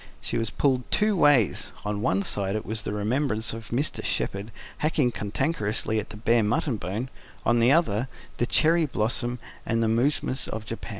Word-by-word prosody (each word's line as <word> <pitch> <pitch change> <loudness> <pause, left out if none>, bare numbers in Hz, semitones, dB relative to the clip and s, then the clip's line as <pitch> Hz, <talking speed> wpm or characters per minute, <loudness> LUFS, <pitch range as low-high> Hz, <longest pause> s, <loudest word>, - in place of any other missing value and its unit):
She - - -4
was 115 -1 -1
pulled 130 -1 0
two 210 0 +2
ways: 145 - +3 0.2
on 105 - 0
the - - -4
one 100 -1 +1
side 100 +1 -1
was 110 0 0
the 105 - -4
remembrance 110 +2 0
of 115 -1 -8
Mr. 135 +6 -2
Shepherd 100 +3 -1 0.3
hacking 150 -5 +2
cantankerously 110 0 -1
at 105 - -6
the 105 - -7
bare 115 +2 +3
mutton 115 +3 0
bone; 105 +8 -4 0.3
on 120 0 +3
the 120 +3 +5
other, 135 -7 +2 0.3
the 120 - 0
cherry 160 +3 +3
blossom 120 0 -1 0.3
and 115 0 0
the - - +2
mousmes 130 +3 0
of 110 0 -5
Japan. 115 +2 -6
115 Hz, 180 wpm, -26 LUFS, 105-130 Hz, 0.3 s, the